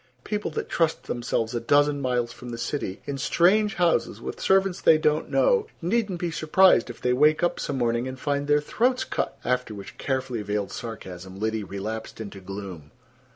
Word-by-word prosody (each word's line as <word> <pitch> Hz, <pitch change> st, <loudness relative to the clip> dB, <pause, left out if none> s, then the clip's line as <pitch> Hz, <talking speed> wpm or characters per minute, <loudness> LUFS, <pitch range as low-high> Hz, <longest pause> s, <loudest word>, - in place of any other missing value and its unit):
People 210 Hz, -1 st, -2 dB
that 155 Hz, -, -4 dB
trust 165 Hz, -1 st, 0 dB
themselves 120 Hz, -1 st, -2 dB
a 120 Hz, -, 0 dB
dozen 145 Hz, +4 st, +3 dB
miles 125 Hz, -2 st, 0 dB
from 125 Hz, -, -10 dB
the 120 Hz, -, -5 dB
city, 115 Hz, -6 st, -4 dB
in 140 Hz, -1 st, -4 dB
strange 195 Hz, +8 st, +3 dB
houses, 175 Hz, -2 st, +1 dB
with -, -, -6 dB
servants 190 Hz, -1 st, +2 dB
they 160 Hz, -, +6 dB
don't 155 Hz, 0 st, +1 dB
know, 480 Hz, -3 st, +3 dB
needn't 200 Hz, +1 st, 0 dB
be 175 Hz, -1 st, -2 dB
surprised 165 Hz, -2 st, +4 dB
if 120 Hz, -, -8 dB
they 125 Hz, -, +1 dB
wake 150 Hz, +5 st, +4 dB
up 175 Hz, -, +1 dB
some 140 Hz, -, -2 dB
morning 120 Hz, 0 st, 0 dB
and 130 Hz, 0 st, -6 dB
find 145 Hz, +1 st, -1 dB
their 145 Hz, 0 st, +4 dB
throats 250 Hz, -, +1 dB
cut." -, -, -3 dB
After 125 Hz, -3 st, -1 dB
which 115 Hz, +4 st, -10 dB
carefully 130 Hz, -4 st, -2 dB
veiled 105 Hz, -1 st, -2 dB
sarcasm 95 Hz, -5 st, -8 dB
Liddy 110 Hz, 0 st, -1 dB
relapsed 105 Hz, +4 st, -6 dB
into 100 Hz, -3 st, -7 dB
gloom. 95 Hz, -5 st, -8 dB
130 Hz, 185 wpm, -25 LUFS, 110-165 Hz, -, they